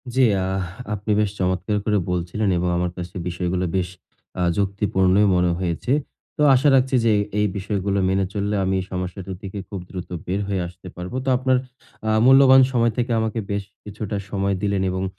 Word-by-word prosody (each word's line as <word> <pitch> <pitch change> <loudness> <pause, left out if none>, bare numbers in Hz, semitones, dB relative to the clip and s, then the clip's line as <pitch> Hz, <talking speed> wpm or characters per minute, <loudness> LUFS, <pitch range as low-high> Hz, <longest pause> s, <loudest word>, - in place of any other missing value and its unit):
জ্বি। 135 - +4 0.2
আহ! 95 0 -1 0.3
আপনি 105 +1 -3
বেশ 105 -1 +2
চমৎকার 95 +3 0
করে 105 -1 +2
বলছিলেন 90 +4 -1
এবং 90 +1 0
আমার 90 0 -1
কাছে 90 +2 -7
বিষয়গুলো 90 +1 -1
বেশ 90 -2 0 0.5
আ - - 0 0.2
যুক্তিপূর্ণই 100 0 +2
মনে 90 -1 +2
হয়েছে। 90 +6 -2 0.5
তো - - -1
আশা 135 +4 +3
রাখছি 130 0 +2
যে 115 - +4
এ - - +2 0.2
এই 105 - +3
বিষয়গুলো 100 0 -1
মেনে 95 0 +1
চললে 105 0 -1
আমি 95 0 0
এই - - -7
সমস্যাটা 90 +1 -4
থেকে 100 -1 -7
খুব 100 - -5
দ্রুত 90 -2 -7 0.2
বের 95 +3 -1
হয়ে 100 -2 -1
আসতে 90 +1 -13
পারবো। 90 +7 -6
তো - - +1
আপনার 130 0 +2 0.5
আ - - +1 0.2
মূল্যবান 135 0 +8
সময় 115 -1 +3
থেকে 120 0 0
আমাকে 110 0 -1
বেশ 100 0 -1 0.2
কিছুটা 105 0 -5
সময় 100 -1 0
দিলেন 100 -2 0
এবং 95 +1 -2
100 Hz, 185 wpm, -22 LUFS, 90-105 Hz, 0.5 s, মূল্যবান